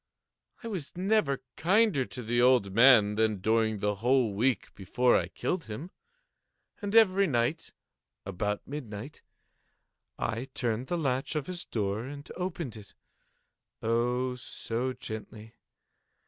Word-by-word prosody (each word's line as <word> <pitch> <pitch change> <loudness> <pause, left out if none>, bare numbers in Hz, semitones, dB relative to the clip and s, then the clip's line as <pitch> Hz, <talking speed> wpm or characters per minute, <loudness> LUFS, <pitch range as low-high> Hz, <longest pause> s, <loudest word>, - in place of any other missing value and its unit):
I - - -5
was 180 -7 -5
never 185 -8 +1
kinder 190 - +3
to 125 - -8
the 120 +2 +1
old 125 -6 +4
man 115 -3 +6
than 110 -1 +1
during 110 +2 +1
the 105 +1 0
whole 125 -3 +3
week 120 +4 0
before 120 +6 +2
I 90 - +1
killed 170 - -3
him. 125 - -7 0.9
And 205 +1 -3
every 200 -3 +6
night, 130 +3 -1 0.5
about 105 +2 -3
midnight, 130 -2 -7 1.0
I 115 +4 -2
turned 120 +1 -1
the 175 - -1
latch 135 -2 -1
of 150 -3 -1
his 180 -1 -5
door 105 0 -2
and 140 +2 -8
opened 170 - -4
it—oh, 120 +4 -4
so 125 0 -4
gently! 110 -1 -8
125 Hz, 125 wpm, -29 LUFS, 110-150 Hz, 1.0 s, man